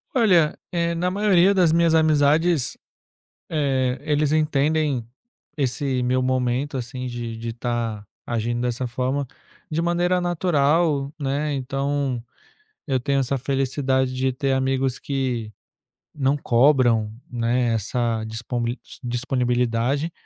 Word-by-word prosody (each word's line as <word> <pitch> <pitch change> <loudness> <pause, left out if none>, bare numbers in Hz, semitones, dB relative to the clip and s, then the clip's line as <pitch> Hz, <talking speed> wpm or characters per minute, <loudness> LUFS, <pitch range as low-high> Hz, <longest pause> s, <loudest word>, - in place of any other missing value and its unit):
Olha, 180 -11 +4
eh, 170 -1 0
na 180 +2 0
maioria 200 -2 +4
das 180 -4 +4
minhas 165 0 +3
amizades, 155 -1 +3 0.7
eh, 135 -4 0
eles 150 0 +1
entendem 150 -4 +1 0.5
esse 135 -2 0
meu 130 +1 +1
momento, 130 +2 0
assim, 125 +1 -5
de 120 -2 -5
de 115 0 -5
tá 115 -3 -3 0.2
agindo 120 +1 -1
dessa 125 +1 -1
forma, 130 +3 -2 0.4
de 155 - 0
maneira 175 +1 +1
natural, 155 -4 +1
né, 145 +2 -1
então 135 -1 -2 0.7
eu 130 -2 +1
tenho 140 +2 0
essa 135 +1 0
felicidade 130 0 0
de 130 +1 0
ter 135 +1 0
amigos 130 -1 0
que 125 -6 -2 0.6
não 140 0 +1
cobram, 120 -5 +3 0.2
né, 120 0 +1
essa 115 +1 -1
disponblit 120 +2 -3 0.2
d 120 - -4
disponibilidade. 125 +3 0
135 Hz, 120 wpm, -23 LUFS, 120-150 Hz, 0.7 s, Olha